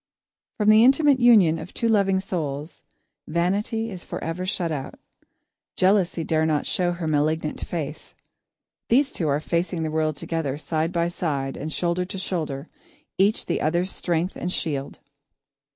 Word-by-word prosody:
From 210 -1 +3
the 215 +1 +7
intimate 275 +1 +5
union 205 -10 +6
of 160 +3 -10
two 230 - 0
loving 200 -4 +3
souls, 155 -5 -4 0.5
Vanity 200 +7 0
is 180 -3 -7
forever 175 +3 -4
shut 180 -4 -1
out. 140 -3 -4 0.8
Jealousy 185 -3 +2
dare 160 0 +1
not 150 -2 0
show 175 -1 0
her 175 -1 -5
malignant 155 0 0
face. 155 -3 -5 0.7
These 275 +4 +3
two 165 - -2
are 145 0 +2
facing 170 +1 -1
the 155 - -2
world 155 -1 0
together, 145 -2 -3
side 160 +1 -1
by 170 -1 +1
side 145 -6 -2
and 155 +2 -5
shoulder 175 +2 0
to 190 - -7
shoulder, 160 -6 -3 0.5
each 200 +3 +3
the - - -1
other's 175 +5 0
strength 175 +1 -1
and 180 - -3
shield. 140 -6 -3
170 Hz, 150 wpm, -24 LUFS, 155-190 Hz, 0.8 s, the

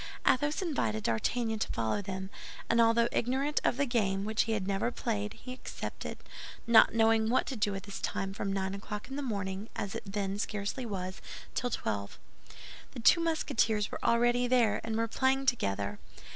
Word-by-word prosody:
Athos 290 +7 +2
invited 115 - -1
D'Artagnan 220 - 0
to - - -1
follow 115 - 0
them; 190 0 -5 0.4
and 230 0 +4
although 230 +1 +4
ignorant 270 +5 +1
of - - +2
the 285 - +2
game, 200 -6 0
which 220 0 +1
he 225 - 0
had 205 -4 -1
never 195 +4 0
played, 105 - -2
he 255 - -8
accepted, 255 - -6 0.5
not 230 -1 +6
knowing 225 -1 +4
what 250 - +3
to 270 - -4
do 210 -2 +1
with 195 -1 -5
his 200 -1 -6
time 195 0 -2
from 195 0 -2
nine 190 -1 -1
o'clock 205 +3 -6
in 270 - -5
the 290 - -2
morning, 200 -4 -3
as 200 - -3
it - - -5
then 200 -1 -2
scarcely 210 +4 -3
was, 185 -2 -4 0.3
till 245 - -1
twelve. 100 - -3 0.8
The - - -7
two 335 +9 +6
Musketeers 225 -10 +1
were - - -6
already 240 +1 +3
there, 240 -4 +3
and 225 -1 -2
were 230 0 +1
playing 265 +3 +1
together. 100 - 0
220 Hz, 185 wpm, -31 LUFS, 195-245 Hz, 0.8 s, not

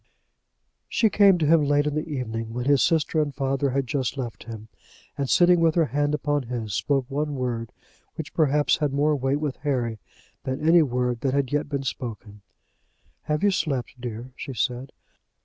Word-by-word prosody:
She 220 -3 +2
came 200 -3 +6
to 160 - 0
him 160 0 +5
late 145 0 +2
in 150 - -1
the 155 +2 -3
evening 115 -4 -4
when 125 +1 -3
his 140 -1 +4
sister 160 -1 +2
and 145 -3 -3
father 135 0 0
had 135 +1 0
just 130 0 -2
left 120 -5 -5
him, 110 -2 -8 0.5
and 140 -3 -2
sitting 175 0 +5
with 165 -1 +3
her 165 -2 +4
hand 145 +1 +1
upon 145 0 0
his, 115 -4 -4
spoke 135 +4 0
one 145 +2 -2
word, 120 -3 -3 0.4
which 160 -1 -7
perhaps 150 -2 +2
had 150 -3 -1
more 150 +2 +2
weight 135 +1 0
with 150 -3 -3
Harry 125 -6 -2 0.4
than 135 +4 -2
any 170 +1 +7
word 125 -3 -1
that 135 -1 0
had 140 -1 0
yet 150 0 0
been 140 -2 -2
spoken. 110 -5 -6 0.8
"Have 150 +2 -1
you 205 - +4
slept, 135 -9 -2
dear?" 120 +1 -6
she 135 -3 -7
said. 125 +3 -2
140 Hz, 185 wpm, -25 LUFS, 125-150 Hz, 0.8 s, any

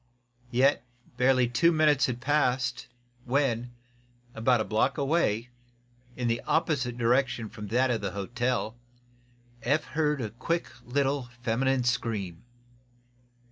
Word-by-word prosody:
Yet 130 +4 +3 0.3
barely 130 -1 +3
two 145 +8 +3
minutes 150 -4 +3
had 120 -1 -4
passed 130 -3 0 0.4
when, 125 -2 0 0.6
about 120 +2 +2
a - - +1
block 110 +9 +1
away, 135 -6 +1 0.7
in 125 -1 -2
the 115 0 0
opposite 140 -7 0
direction 120 -1 +1
from 105 -1 -8
that 125 +4 +2
of 115 - -1
the 100 - -2
hotel, 120 +3 -2 0.9
Eph 145 +4 +1
heard 150 +1 0
a 110 -4 -3
quick 165 +9 -2 0.2
little 135 0 0
feminine 130 +2 +1
scream. 110 -8 -2
125 Hz, 120 wpm, -28 LUFS, 115-140 Hz, 0.9 s, Yet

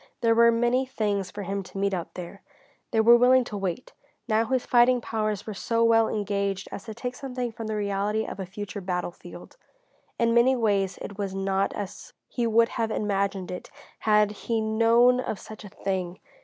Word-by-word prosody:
There 230 -1 +4
were 235 0 +6
many 240 +3 +2
things 205 -6 -1
for 205 +2 -7
him 195 +1 -3
to 190 +1 -11
meet 200 0 0
out 175 -3 -4
there. 180 +2 -8 0.5
They 225 - 0
were 235 +2 +7
willing 250 +1 +5
to 225 - -7
wait. 195 +3 -4 0.3
Now 220 0 +2
his 260 +1 -1
fighting 245 0 +4
powers 215 -3 -2
were 215 - -5
so 230 +3 0
well 225 -1 +4
engaged 200 -2 -2
as - - -7
to 220 -2 -7
take 245 +2 -4
something 250 -2 -4
from 225 0 -7
the 215 - -2
reality 205 +1 -1
of - - -7
a 190 - -4
future 205 +1 -6
battlefield. 180 - -6 0.6
In 230 0 +2
many 240 +3 +5
ways 200 -5 +1
it 200 0 -8
was 195 -2 -3
not 195 0 0
as 200 -3 -7
he 240 -1 -1
would 230 +1 +4
have 225 -1 -2
imagined 200 -3 -1
it 180 - -7 0.3
had 210 -1 +3
he 225 +2 -2
known 230 +3 +4
of 235 - -3
such 215 0 -11
a 205 - -9
thing. 185 -2 -3
215 Hz, 195 wpm, -26 LUFS, 195-230 Hz, 0.6 s, were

